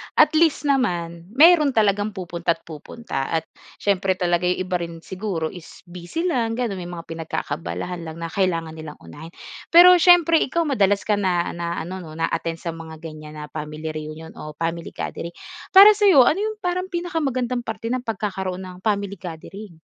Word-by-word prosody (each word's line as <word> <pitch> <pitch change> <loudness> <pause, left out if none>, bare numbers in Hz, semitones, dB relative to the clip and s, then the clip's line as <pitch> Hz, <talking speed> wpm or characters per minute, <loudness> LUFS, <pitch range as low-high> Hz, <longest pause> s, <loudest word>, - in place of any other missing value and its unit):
at - - +6
least 315 -1 +3
naman 175 - -1
meron 305 -2 +6
talagang 205 -1 +1
pupunta't-pupunta. 170 -2 -4
At, 165 -1 -1 0.3
siyempre 195 -1 0
talaga 175 -1 0
ay 180 +1 0
iba 180 -1 -2
rin 170 -1 -7
siguro 185 -5 -4
is 175 -3 -13
busy 180 - -6
lang 240 -10 0
gano'n, 230 -6 -2
may 175 - -6
mga 175 -1 -7
pinagkaka-abalahan 165 +2 -4
lang 160 - -7
na 165 0 -6
kailangan 165 -4 0
nilang 155 -1 -9
unahin. 160 - -11 0.3
Pero 355 +1 +8
siyempre 335 -2 +6
ikaw 335 +5 0
madalas 205 -9 +1
ka 210 -1 +1
na 180 -3 0
na 170 0 -4
ano 180 +4 -5
'no, 160 -4 -10
na-attend 165 0 -2
sa 170 - -2
mga 165 -1 -9
ganyan 155 -1 -9
na 150 -2 -8
family 155 +1 -5
reunion 155 +1 -8
o 150 -1 -8
family 165 +1 -4
gathering, 170 +1 -5 0.4
para 400 +2 +11
sa'yo, 400 - +6
ano 310 +9 +2
'yong 435 +1 -2
parang 365 +1 -1
pinakamagandang 275 -9 -2
parte 225 +1 -4
ng 255 - 0
pagkakaroon 190 -4 -3
ng 185 -1 -9
family 200 -1 -2
gathering? 175 +1 -9
185 Hz, 170 wpm, -22 LUFS, 165-245 Hz, 0.4 s, para